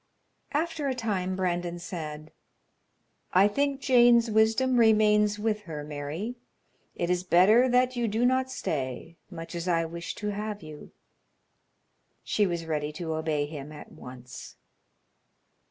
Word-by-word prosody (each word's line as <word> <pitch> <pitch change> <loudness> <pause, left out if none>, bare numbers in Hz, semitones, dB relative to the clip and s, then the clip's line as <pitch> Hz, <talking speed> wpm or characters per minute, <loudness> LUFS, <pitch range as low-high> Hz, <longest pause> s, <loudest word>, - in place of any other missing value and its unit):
After 310 -1 -1
a 265 - -1
time 195 -6 -2
Brandon 175 -2 -2
said: 155 -3 -7 1.0
"I 190 +2 +6
think 280 +5 -1
Jane's 240 -3 +5
wisdom 225 +4 +3
remains 210 -2 +4
with 215 0 -1
her, 150 -2 -5
Mary. 150 +11 -5 0.6
It 175 0 -1
is 180 0 +1
better 205 +8 +5
that 250 +1 +2
you 240 -1 0
do 225 +3 0
not 260 +1 +2
stay, 150 - -4
much 165 -2 -8
as 170 +1 -4
I 165 -2 +2
wish 170 +1 -6
to 210 - -4
have 210 -1 -4
you." 155 -1 -11 1.3
She 205 -2 +1
was 170 -2 -3
ready 150 -2 -2
to 160 0 -4
obey 155 -2 -1
him 145 -1 -8
at 150 - -11
once. 125 0 -11
185 Hz, 140 wpm, -27 LUFS, 160-230 Hz, 1.3 s, I